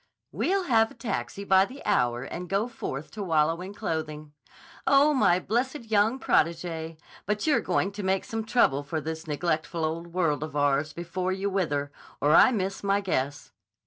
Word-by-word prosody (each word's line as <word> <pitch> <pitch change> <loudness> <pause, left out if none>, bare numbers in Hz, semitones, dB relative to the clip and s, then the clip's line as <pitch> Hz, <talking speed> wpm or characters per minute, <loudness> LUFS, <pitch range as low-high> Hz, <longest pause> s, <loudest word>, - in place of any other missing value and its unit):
"We'll 390 +1 0
have 225 -7 +3
a - - -14
taxi 230 -3 -4
by 190 -1 +5
the 265 +6 -12
hour 120 0 +1
and 175 +6 -6
go 200 +4 +1
forth 155 - -6
to 215 - -7
wallow 165 -2 +1
in 190 +2 -8
clothing. 155 -6 -4 0.5
Oh, 285 +2 +5
my 180 -10 +4
blessed 240 +3 -2
young 220 +5 +3
protégée, 165 -4 0 0.3
but 210 0 -1
you're 305 -2 +3
going 185 +2 0
to 205 +1 -6
make 190 0 0
some 225 0 -3
trouble 215 - +2
for 145 +3 -3
this 160 +2 -6
neglectful 160 +1 -1
old 165 +2 -3
world 170 -4 0
of 155 -1 -5
ours 145 +1 +1
before 175 +3 -3
you 195 +1 -2
wither, 145 -7 -1 0.3
or 150 +1 +3
I 170 - +8
miss 195 -4 -2
my 200 0 +2
guess." 145 -7 -2
180 Hz, 175 wpm, -27 LUFS, 155-210 Hz, 0.5 s, I